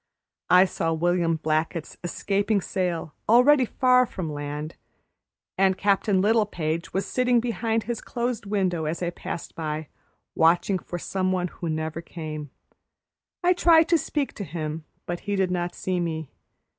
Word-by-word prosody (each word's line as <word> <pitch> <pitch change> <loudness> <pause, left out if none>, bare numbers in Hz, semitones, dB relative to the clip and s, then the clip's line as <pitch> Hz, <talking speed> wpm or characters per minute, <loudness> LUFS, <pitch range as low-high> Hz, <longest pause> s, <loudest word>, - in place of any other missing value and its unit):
I 180 +1 +7
saw 165 -3 -1
William 170 0 +1
Blackett's 155 +1 -1
escaping 200 +4 0
sail 175 -4 -2 0.2
already 255 +4 +6
far 250 +1 +3
from 165 -8 -5
land, 145 +2 -5 0.8
and 190 -1 +4
Captain 200 -1 +2
Littlepage 185 -7 0
was 190 +1 -1
sitting 250 +2 +2
behind 225 -1 -1
his 235 0 -4
closed 235 -4 -3
window 185 -5 0
as 160 +3 -2
I 175 - -1
passed 170 - -6
by, 155 -1 -4 0.4
watching 175 +3 +3
for 175 - -6
some 185 +2 -1
one 180 -1 0
who 170 - -6
never 160 +1 -3
came. 155 -3 -7 0.9
I 360 +1 +5
tried 335 -2 +5
to 335 - +5
speak 285 0 -2
to 205 - -6
him, 155 -2 -5 0.2
but 175 0 -3
he 205 - +1
did 190 -2 +1
not 175 -1 -2
see 185 -1 -2
me. 160 -4 -3
180 Hz, 150 wpm, -25 LUFS, 160-215 Hz, 0.9 s, I